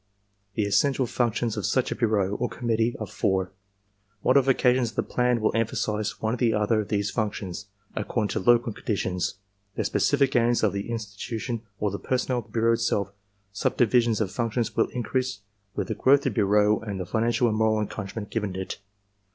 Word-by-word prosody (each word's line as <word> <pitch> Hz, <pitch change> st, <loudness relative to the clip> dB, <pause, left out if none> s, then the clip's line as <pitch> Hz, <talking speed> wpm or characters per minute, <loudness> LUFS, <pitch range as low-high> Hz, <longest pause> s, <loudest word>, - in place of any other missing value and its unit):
The 105 Hz, -, +1 dB
essential 130 Hz, +6 st, +2 dB
functions 120 Hz, -1 st, 0 dB
of 105 Hz, -, -2 dB
such 130 Hz, -1 st, +1 dB
a -, -, -1 dB
bureau, 105 Hz, -4 st, +1 dB
or 120 Hz, -, -1 dB
committee, 115 Hz, -1 st, 0 dB
are 110 Hz, -, -3 dB
four. 95 Hz, -2 st, -1 dB, 0.7 s
Modifications 130 Hz, -2 st, +3 dB
of 110 Hz, -, -15 dB
the -, -, +1 dB
plan 125 Hz, -1 st, +1 dB
will 110 Hz, -, +2 dB
emphasize 110 Hz, -1 st, -1 dB
one 110 Hz, +1 st, -1 dB
or -, -, -1 dB
the 115 Hz, -2 st, +2 dB
other 105 Hz, +1 st, +2 dB
of 105 Hz, -, -7 dB
these 100 Hz, -1 st, 0 dB
functions, 100 Hz, -3 st, -3 dB, 0.3 s
according 105 Hz, 0 st, -1 dB
to -, -, -1 dB
local 120 Hz, +2 st, +3 dB
conditions, 95 Hz, -4 st, -2 dB, 0.4 s
the -, -, -1 dB
specific 135 Hz, 0 st, +2 dB
aims 120 Hz, -1 st, +3 dB
of 105 Hz, -3 st, +3 dB
the 100 Hz, +3 st, -4 dB
institution 115 Hz, +1 st, -4 dB, 0.2 s
or 105 Hz, -1 st, 0 dB
the 100 Hz, -, -4 dB
personnel 130 Hz, -1 st, 0 dB
of 115 Hz, -, -9 dB
the 110 Hz, -, -22 dB
bureau 115 Hz, +1 st, +3 dB
itself; 105 Hz, -4 st, 0 dB, 0.4 s
subdivi 120 Hz, +4 st, +3 dB
sion 115 Hz, -1 st, +1 dB
of 100 Hz, -4 st, -1 dB
functions 115 Hz, +1 st, -1 dB
will -, -, +3 dB
increase 125 Hz, -3 st, -2 dB, 0.3 s
with -, -, -2 dB
the -, -, -1 dB
growth 140 Hz, +2 st, +4 dB
of -, -, -14 dB
the -, -, +1 dB
bureau 105 Hz, +1 st, +3 dB
and 100 Hz, -3 st, -5 dB
the 90 Hz, -, -3 dB
financial 115 Hz, +4 st, +1 dB
and 110 Hz, -, 0 dB
moral 110 Hz, -1 st, +3 dB
encouragement 105 Hz, 0 st, -5 dB
given 105 Hz, -5 st, -2 dB
it. 95 Hz, +1 st, -5 dB
110 Hz, 190 wpm, -26 LUFS, 105-120 Hz, 0.7 s, growth